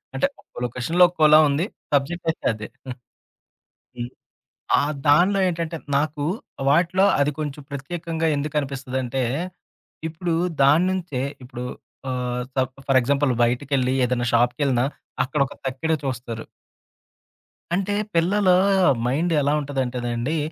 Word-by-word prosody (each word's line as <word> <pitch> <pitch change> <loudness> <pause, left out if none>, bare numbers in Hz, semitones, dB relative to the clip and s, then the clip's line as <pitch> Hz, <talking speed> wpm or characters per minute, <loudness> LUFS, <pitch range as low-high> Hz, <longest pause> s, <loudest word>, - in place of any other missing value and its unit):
అంటే, 275 - +2
ఒక్కో - - -23
లొకేషన్‌లో 145 +9 +2
ఒక్కోలా 155 -3 +6
ఉంది. 145 +5 +1 0.3
సబ్జెక్ట్ 165 +5 0
అయితే 160 - -4
అదే. 110 0 -7 1.3
హ్మ్. 120 0 -4 0.7
ఆ - - +2 0.3
దానిలో 180 +7 +5
ఏంటంటే, 165 -1 -3 0.2
నాకు 145 0 -1 0.5
వాటిలో 175 +5 +3 0.2
అది 140 +1 +3
కొంచెం 150 -1 -4
ప్రత్యేకంగా 165 +3 -3
ఎందుకునిపిస్తదంటే, 135 -3 -2 0.9
ఇప్పుడు 165 +1 -2 0.3
దాని 150 +6 +5
నుంచే 175 -9 -3 0.2
ఇప్పుడు 125 -1 -7 0.5
ఆహ్, 125 -1 -2
స - - -3 0.3
ఫర్ 135 -1 +5
ఎగ్జాంపుల్ 140 +2 +1
బయటికెళ్ళి 130 +1 +1
ఏదైనా 120 0 0
షాపుకెళ్ళినా 125 +1 +2 0.4
అక్కడొక 140 0 -1
తక్కెడ 135 +5 -1
చూస్తారు. 120 -3 -4 1.3
అంటే, 195 +3 0 0.2
పిల్లలు 185 +3 +3 0.5
మైండ్ 155 +8 +1
ఎలా 145 +1 +2
ఉంటదంటేండి, 130 0 -2
140 Hz, 110 wpm, -23 LUFS, 125-165 Hz, 1.3 s, ఒక్కోలా